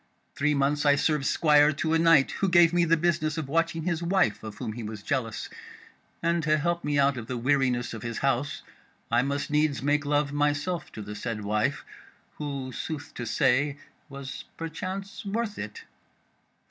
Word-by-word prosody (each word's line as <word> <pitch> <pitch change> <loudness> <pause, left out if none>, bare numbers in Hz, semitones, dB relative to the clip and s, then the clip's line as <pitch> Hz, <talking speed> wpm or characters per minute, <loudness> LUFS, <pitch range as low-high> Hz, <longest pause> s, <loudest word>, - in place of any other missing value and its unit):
Three 150 +1 +1
months 145 +1 +1
I 145 -1 +5
served 150 -1 +1
squire 150 -2 +5
to 160 +2 -1
a 165 - +3
knight 165 -4 +5
who 195 - +3
gave 175 -1 +6
me 175 -1 +3
the 165 0 +3
business 155 -2 0
of 155 -4 -3
watching 165 +2 0
his 170 -1 -1
wife 175 - +1
of 110 -1 -8
whom 110 - -4
he 120 - -6
was 105 -1 -7
jealous; 120 -5 -2 0.8
and 170 0 +2
to 155 0 +2
help 170 +3 -1
me 145 0 0
out 140 -1 +3
of 110 -2 -6
the 125 - -3
weariness 125 -1 +1
of 110 - -6
his 115 0 -4
house 135 +1 -1 0.5
I 120 +1 +4
must 140 +2 -2
needs 150 -2 +1
make 145 +1 +2
love 145 0 0
myself 145 +4 -1
to 110 - -7
the 105 +1 -7
said 105 0 -4
wife, 105 +6 0 0.5
who 140 -3 -4
sooth 145 +4 -6
to 120 - -5
say 140 +4 +2 0.3
was 135 -1 -7
perchance 185 +6 -5
worth 210 +1 -3
it. 455 - -7
145 Hz, 185 wpm, -27 LUFS, 130-165 Hz, 0.8 s, gave